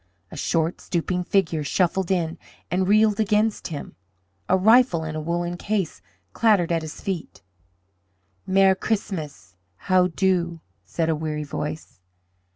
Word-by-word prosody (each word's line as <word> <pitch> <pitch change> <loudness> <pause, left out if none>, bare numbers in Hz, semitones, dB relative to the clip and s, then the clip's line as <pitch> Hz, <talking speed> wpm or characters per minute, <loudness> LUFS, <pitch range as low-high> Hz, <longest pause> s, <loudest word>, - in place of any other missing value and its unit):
A - - -8
short, 165 +1 -1
stooping 180 +1 -2
figure 170 -5 +1
shuffled 180 +4 0
in 170 -3 -1 0.3
and 185 +1 +1
reeled 215 0 +4
against 215 0 +1
him. 155 -4 -7 0.5
A 190 - +4
rifle 220 -3 +4
in 155 -1 -5
a 155 - -3
woollen 175 +2 -2
case 200 -4 -2 0.3
clattered 205 -7 +3
at 165 -1 +1
his 155 -1 -8
feet. 185 - -5 1.0
"Mer' 190 0 +5
Christmas! 160 - -4 0.2
How 185 - +2
do?" 175 -2 0 0.3
said 165 -2 -2
a 160 - +1
weary 150 -1 -3
voice. 150 - -6
175 Hz, 135 wpm, -24 LUFS, 160-195 Hz, 1.0 s, Mer